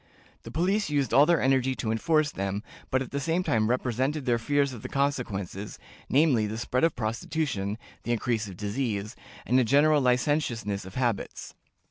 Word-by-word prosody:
The - - -10
police 185 - 0
used 140 -5 0
all 145 +2 +7
their 170 -2 +4
energy 130 0 +2
to 110 -3 -2
enforce 155 +6 +2
them, 100 -1 -3 0.3
but 130 0 +1
at 130 - -11
the 140 - -2
same 165 +5 0
time 110 -8 +1
represented 130 +4 0
their 120 -2 +2
fears 140 +3 +1
of 115 - -8
the - - -6
consequences, 105 -8 -2 0.3
namely, 135 -7 +3
the 110 +1 -4
spread 125 +3 -1
of 165 - +3
prostitution, 110 -2 -2 0.2
the 120 - -3
increase 115 -2 0
of 95 -3 -9
disease, 105 0 -2 0.3
and 125 +2 +3
a - - +4
general 145 +5 +4
licentiousness 125 -6 0
of 95 - -11
habits. 120 -5 -2
125 Hz, 175 wpm, -27 LUFS, 110-145 Hz, 0.3 s, all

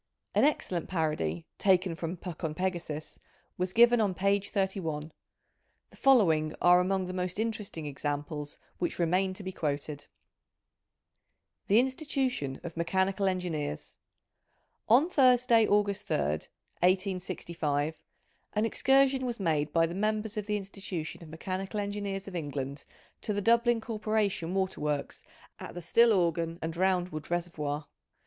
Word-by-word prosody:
An - - +3
excellent 185 - 0
parody, 150 - -1
taken 185 -2 +3
from 165 +2 -4
Puck 175 -1 -8
on 155 -1 -2
Pegasus, 170 -4 -3 0.4
was 180 0 -1
given 235 +2 +6
on 200 -4 +1
page 200 +1 +1
31; 175 -6 -2 0.8
the - - -17
following 165 - +4
are 180 0 +6
among 190 +1 +1
the 180 - -5
most 180 0 -2
interesting 210 -7 -3
examples 145 +1 -4 0.2
which 175 - -1
re 170 - +2
main 185 +3 +1
to 200 - -8
be 190 - -4
quoted: 145 -3 -3 0.8
— - - -54
The 210 +3 +6
Institution 260 - -1
of 170 - -7
Mechanical 190 +4 +1
Engineers, 170 - -3 0.9
On 255 +8 +6
Thursday, 250 -7 +5
August 205 -1 +1
3rd, 75 +2 0 0.3
1865, 170 -5 0 0.5
an 210 +1 +1
excursion 270 +3 +3
was 240 -3 -3
made 155 -5 0
by 165 +1 +4
the 165 - -4
Members 215 +2 -1
of 210 -1 -3
the 210 0 +1
Institution 190 -5 -6
of 165 - -11
Mechanical 190 +5 -4
Engineers 200 -1 -3
of 190 - -7
England, 140 -3 -4 0.4
to 210 - -1
the 205 - 0
Dublin 235 +2 +4
Corporation 215 -5 -1
"Waterworks 150 -7 -2 0.4
at - - -8
the - - -4
Stillorgan 170 -5 +3
and 160 0 -3
Roundwood 180 -3 0
Reservoir. 155 -4 -2
185 Hz, 135 wpm, -30 LUFS, 160-210 Hz, 0.9 s, given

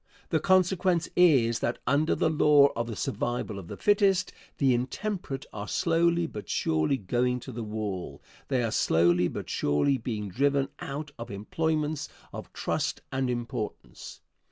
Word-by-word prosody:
The - - +2
consequence 185 -2 +2
is 130 -10 +4
that 120 - -1
under 145 +4 +2
the 160 - +1
law 150 -2 +6
of 115 0 -2
the 115 - -5
survival 120 -5 -2
of 90 - -10
the - - -7
fittest, 200 -3 +2 0.2
the 135 -3 +3
intemperate 135 - -3
are 105 0 -5
slowly 170 0 +2
but 105 -10 -8
surely 80 - +1
going 125 +4 0
to 130 - -8
the 120 0 -5
wall; 105 -4 -4 0.3
they 130 -3 +1
are 115 - -1
slowly 85 -2 +3
but - - -6
surely 75 - +1
being 105 -4 -4
driven 140 +7 +1
out 150 -2 -5
of 115 - -6
employments 150 +8 -2 0.2
of - - -8
trust - - -2
and 130 -1 -1
importance. 120 -3 -5
130 Hz, 155 wpm, -28 LUFS, 110-160 Hz, 0.3 s, law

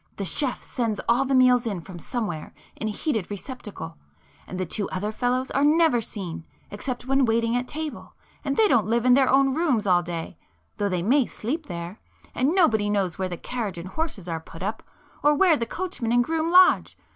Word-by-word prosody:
The 200 - -4
chef 250 - +1
sends 225 -4 -2
all 245 +3 +3
the 270 0 +1
meals 250 -2 +5
in 200 -5 -2
from 175 +1 -10
somewhere, 175 - -4 0.2
in 220 - -4
a - - -1
heated 220 - -2
receptacle—and 165 - -9
the 185 - -1
two 200 +4 -2
other 205 +3 -3
fellows 250 +3 -1
are 275 - +1
never 305 -4 +4
seen 190 -7 -6 0.3
except 245 +4 -5
when 270 +1 +2
waiting 230 0 +1
at 245 0 -1
table, 310 -1 -6 0.3
and 275 -1 -2
they 440 - +5
don't 230 - +3
live 235 +2 +1
in 250 - +6
their 265 0 +4
own 270 0 +4
rooms 265 -9 +1
all 180 -2 +4
day, 170 -1 -6 0.4
though 205 -1 0
they 180 -2 -1
may 260 +5 +3
sleep 295 +9 -4
there,—and 190 - -4
nobody 220 - +3
knows 195 -4 -1
where 185 -1 -1
the 175 - -5
carriage 220 -6 -4
and 170 +2 -7
horses 300 - -4
are 165 -2 -2
put 165 +2 -11
up, 215 +3 -3 0.4
or 295 +1 +4
where 350 0 +5
the 230 -5 -3
coachman 335 -8 -3
and 245 0 +4
groom 325 +4 -1
lodge. 365 +1 +5
230 Hz, 200 wpm, -25 LUFS, 190-270 Hz, 0.4 s, in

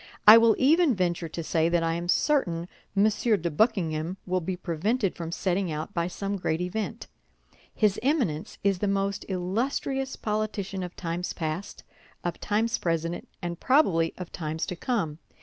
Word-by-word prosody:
I 215 - +13
will 230 -1 +6
even 305 0 +4
venture 175 -3 -1
to 165 +1 -5
say 160 0 +1
that 170 -1 +2
I 165 0 +1
am 170 +1 -3
certain 175 - +1 0.3
M. 200 - +6
de 210 -5 +1
Buckingham 170 -3 +1
will 185 0 0
be 180 +2 -3
prevented 190 +5 -1
from 165 -1 -5
setting 185 0 0
out 155 +6 -4
by 170 0 0
some 200 +3 -3
great 160 -3 -1
event. 180 +4 -3 0.7
His 210 -3 +2
Eminence 245 - 0
is 195 -2 +2
the 205 - 0
most 200 0 -1
illustrious 255 +8 -1
politician 210 -3 -2
of 180 -1 -6
times 175 +1 -3
past, 160 +4 -4 0.4
of 175 - -3
times 220 +2 0
present, 165 0 -2 0.2
and 170 0 -4
probably 190 - +3
of 180 -2 -7
times 160 -1 -3
to 180 - -4
come. 170 - -2
185 Hz, 165 wpm, -27 LUFS, 170-215 Hz, 0.7 s, I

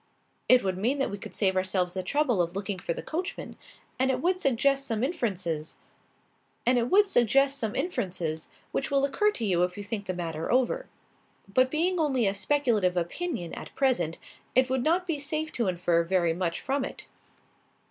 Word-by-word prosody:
"It 255 0 +7
would 185 -1 -1
mean 245 +8 +1
that 275 - 0
we 200 - -5
could - - -9
save 190 -2 +2
ourselves 185 -1 +1
the 190 - -2
trouble 245 0 +1
of 170 +1 -2
looking 195 -1 -3
for 170 - -3
the - - -4
coachman. 350 +4 -4 0.4
And 260 +1 +3
it 255 -1 +1
would 365 +5 +1
suggest 275 0 +2
some 225 -1 -1
inferences, 185 - -2 2.9
which 270 - -1
will 275 -1 +3
occur 415 +10 +2
to 235 - -3
you 180 -4 +2
if 180 +1 0
you 205 - -5
think 205 -1 -5
the 185 - -2
matter 165 -2 -3
over. 260 - +1 0.6
But 255 +6 +3
being 345 +5 +1
only 270 -7 +2
a 195 - +2
speculative 215 -6 +1
opinion, 175 - -3
at - - -8
present, 210 - +1 0.4
it 255 0 +4
would 260 -2 +1
not 345 +5 +2
be 330 -5 -2
safe 310 +2 -3
to 235 -4 -1
infer 175 -2 +2
very 170 -1 +1
much 170 -1 -2
from 275 0 -1
it." - - -7
230 Hz, 170 wpm, -28 LUFS, 180-280 Hz, 2.9 s, It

